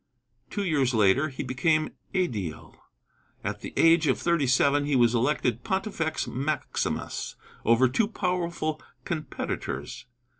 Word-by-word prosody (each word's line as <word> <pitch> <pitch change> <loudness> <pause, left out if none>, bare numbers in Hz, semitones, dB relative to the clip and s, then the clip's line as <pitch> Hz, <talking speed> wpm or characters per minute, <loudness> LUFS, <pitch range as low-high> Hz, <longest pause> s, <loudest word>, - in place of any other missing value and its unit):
Two 205 - -2
years 140 -8 +1
later 110 +8 +4
he 135 - -5
became 155 +5 +1 0.2
ædile. 105 - -2 0.7
At - - -3
the - - -6
age 165 -1 +5
of 130 - +3
thirty 170 -5 +1
seven 140 +3 +3
he 145 -1 +1
was 120 -2 +4
elected 120 -1 +1
pontifex 190 -5 -1
maximus 145 +4 -2 0.3
over 115 +3 +5
two 205 - +1
powerful 170 -6 -2 0.2
competitors. 155 -5 -4
150 Hz, 120 wpm, -27 LUFS, 125-170 Hz, 0.7 s, age